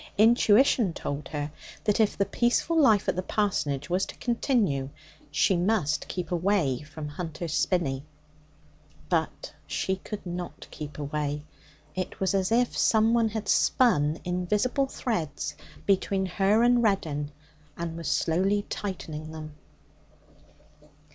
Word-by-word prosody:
Intuition 225 -1 +5
told 145 -2 -4
her 145 -1 -4 0.3
that 210 0 +1
if 215 -2 +2
the 200 - +2
peaceful 240 - +1
life 225 -11 +5
at - - +1
the 185 - -1
parsonage 155 -9 -1
was 180 +2 +1
to - - -9
continue, 225 - 0 0.4
she 170 +5 +3
must 175 -4 +1
keep 180 -2 -4
away 175 -7 +1
from 150 0 -7
Hunter's 160 +1 -5
Spinney. 140 -9 0 1.1
But 165 -4 -1
she 190 0 -1
could 205 +1 -7
not 175 0 -6
keep 150 -2 -7
away. 145 0 -2 0.5
It 185 0 -4
was 190 0 +1
as 190 +1 +1
if 240 +1 +2
someone 225 +1 +3
had 220 0 -4
spun 155 - +3
invisible 210 +10 0
threads 160 - -3 0.3
between 195 0 +2
her 195 +4 +2
and 245 0 +5
Reddin, 155 -9 0 0.5
and 170 -1 -4
was 165 -2 -5
slowly 195 +5 +1
tightening 155 -6 -5
them. 155 -1 -8
185 Hz, 130 wpm, -27 LUFS, 155-215 Hz, 1.1 s, Intuition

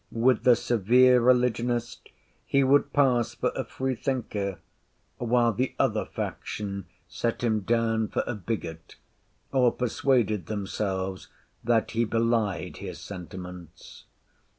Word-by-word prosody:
With 120 +1 +2
the 125 -1 +7
severe 120 +3 +4
religionist 120 -1 +1 0.4
he 140 0 +3
would 140 +2 +3
pass 125 -5 +2
for - - 0
a - - -1
free 130 0 -3
thinker; 105 -7 -3 0.6
while 120 -1 +2
the 125 +6 -2
other - - +1
faction 100 -3 -5 0.2
set 120 +1 -3
him 110 -2 +2
down 115 +1 +1
for - - -1
a - - -3
bigot, 90 -6 -5 0.6
or 125 -3 +4
persuaded 115 - 0
themselves 95 -2 -3 0.4
that 115 -1 +1
he 115 +1 +1
belied 115 -4 0
his - - -7
sentiments. 90 -2 -10
115 Hz, 120 wpm, -27 LUFS, 100-125 Hz, 0.6 s, the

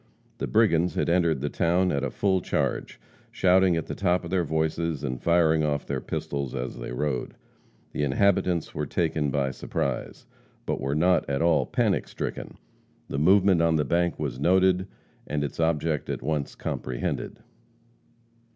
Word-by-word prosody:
The - - -2
brigands 90 -6 +2
had - - 0
entered 85 -5 +2
the 75 - -1
town 90 +1 +2
at 70 0 -1
a 70 - 0
full 95 +5 +1
charge, - - -2 0.3
shouting 95 -1 +3
at 80 - -2
the - - -5
top 90 +1 +1
of 85 - -7
their 95 -2 +2
voices 80 -1 -1
and 65 -3 -3
firing 80 -2 +3
off 75 -1 -1
their - - -3
pistols 70 -3 -4
as 60 0 -4
they - - -6
rode. 70 +1 -2 0.6
The - - -3
inhabitants 85 +3 +1
were - - -3
taken 80 -3 0
by 70 -1 0
surprise, 65 0 -4 0.4
but - - -2
were 70 +2 -1
not 90 +1 +2
at 70 +2 0
all 85 -1 +3
panic - - 0
stricken. - - -6 0.5
The 70 - -2
movement 95 +2 +4
on 85 -1 +3
the 75 -1 +1
bank 85 0 +1
was 70 -4 -4
noted, 95 +3 +3 0.4
and 75 0 -1
its 70 - -5
object 80 -1 0
at - - -3
once 75 -1 -2
comprehended. 65 -1 -4
80 Hz, 165 wpm, -26 LUFS, 70-90 Hz, 0.6 s, movement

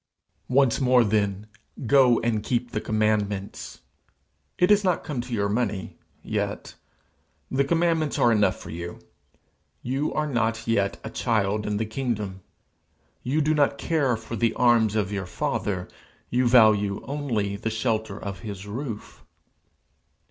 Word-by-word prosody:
'Once 135 -1 +3
more, 125 -2 +5
then, 100 -1 0 0.4
go 125 -1 +5
and 115 -2 0
keep 120 +2 -2
the 105 - -2
commandments. 105 -2 -1 0.8
It 180 +3 +4
is 205 0 +5
not 180 -3 +1
come 135 -5 -3
to 125 +1 -10
your 100 -3 0
money 105 -3 -2 0.2
yet. - - -3 0.8
The 135 +1 +2
commandments 165 0 +1
are 120 - +4
enough 105 -2 +3
for - - -10
you. 85 +1 -6 0.9
You 135 +5 -1
are 155 - +1
not 115 -5 -1
yet 100 -4 +1
a 110 - -6
child 105 -3 0
in 105 0 -1
the 110 - -1
kingdom. 105 -5 -3 0.8
You 145 +5 0
do 155 +1 +2
not 145 -2 +2
care 140 -8 +1
for 115 +1 -7
the 115 +1 +1
arms 115 -3 +3
of 105 -2 0
your 95 -3 -3
father; - - -2 0.4
you 125 +1 +2
value 110 -4 +4
only 120 -9 -2
the 105 +3 -3
shelter 110 -2 -1
of 100 -2 -6
his 100 0 -7
roof. 115 +1 -6
115 Hz, 145 wpm, -25 LUFS, 105-130 Hz, 0.9 s, more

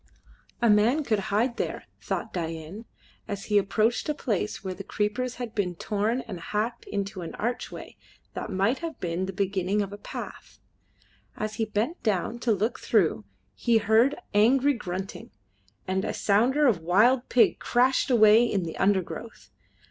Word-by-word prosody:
A - - +5
man 225 +8 +4
could 220 -6 +1
hide 235 +4 +1
there, - - -3 0.2
thought - - -4
Dain, 165 +4 -5 0.4
as 200 -1 -4
he 210 -1 +3
approached 215 - 0
a 300 - 0
place 210 -7 -2
where 190 -1 -3
the 190 +2 -8
creepers 225 +6 -2
had 240 -3 -6
been 185 -4 -1
torn 215 +7 -1
and 185 -8 -8
hacked 215 +7 -3
into 200 -1 -4
an 165 - -7
archway 240 +3 -5 0.4
that - - -5
might 200 +6 +1
have 330 -1 -6
been 175 +2 -2
the - - -3
beginning 195 +1 -1
of 200 0 -7
a 205 - -8
path. - - -8 0.8
As 215 0 -4
he 225 - +1
bent 220 - -2
down 215 +2 -1
to 240 -1 0
look 215 +3 0
through 170 - +1 0.3
he 235 -2 +2
heard 220 +6 +3 0.2
angry 260 +7 +4
grunting, 190 -4 -6 0.6
and 190 +1 0
a - - -3
sounder 245 +9 +3
of 215 -11 +3
wild 225 +10 +3
pig 245 - +4
crashed 255 +3 +2
away 220 -2 +6
in 205 -6 0
the 165 -1 -6
undergrowth. 195 +3 -1
210 Hz, 165 wpm, -27 LUFS, 195-240 Hz, 0.8 s, away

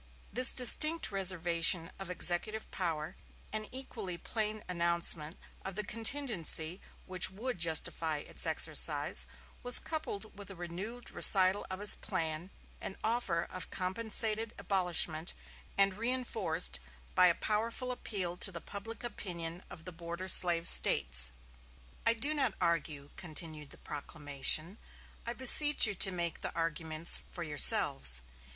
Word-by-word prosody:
This 255 +3 +3
distinct 305 +4 +4
reservation 175 -3 0
of 195 -2 -10
executive 180 +4 +1
power, 165 -2 -6 0.4
and 215 0 -6
equally 220 -9 -8
plain 215 +3 -6
announcement 170 -2 -3 0.3
of 190 -1 -9
the 210 - -6
contingency 210 - -5 0.2
which 185 -1 +4
would 215 +2 -8
justify 160 -1 -1
its 145 - -5
exercise, - - -1 0.3
was 245 0 +4
coupled 265 -11 -5
with 200 -1 -13
a 195 - -12
renewed 185 +8 -10
recital 190 0 +5
of 185 0 -9
his 205 - +6
plan 160 +2 -6 0.3
and 195 - -9
offer 220 -7 -4
of 185 - -11
compensated 220 +3 -2
abolishment 175 -4 -3 0.4
and 195 -1 0
reinforced 230 - +2 0.3
by 180 - +3
a 170 - 0
powerful 230 +4 -4
appeal 190 -8 -4
to 195 - +2
the 170 - -9
public 210 +7 -10
opinion 175 -7 -7
of 160 - -15
the 180 - -9
border 170 +2 -10
slave 175 -2 +3
States. - - +6 0.8
"I 230 - +1
do 280 +7 -1
not 270 -9 0
argue," 155 -4 -4
continued 155 -3 -8
the - - -15
proclamation, 150 +5 -3 0.5
"I 235 - -5
beseech 280 +4 +7
you 215 - -2
to 190 0 +5
make 170 -2 -6
the - - -7
arguments 165 0 0
for 175 - -9
yourselves. 65 - +5
185 Hz, 130 wpm, -29 LUFS, 165-220 Hz, 0.8 s, beseech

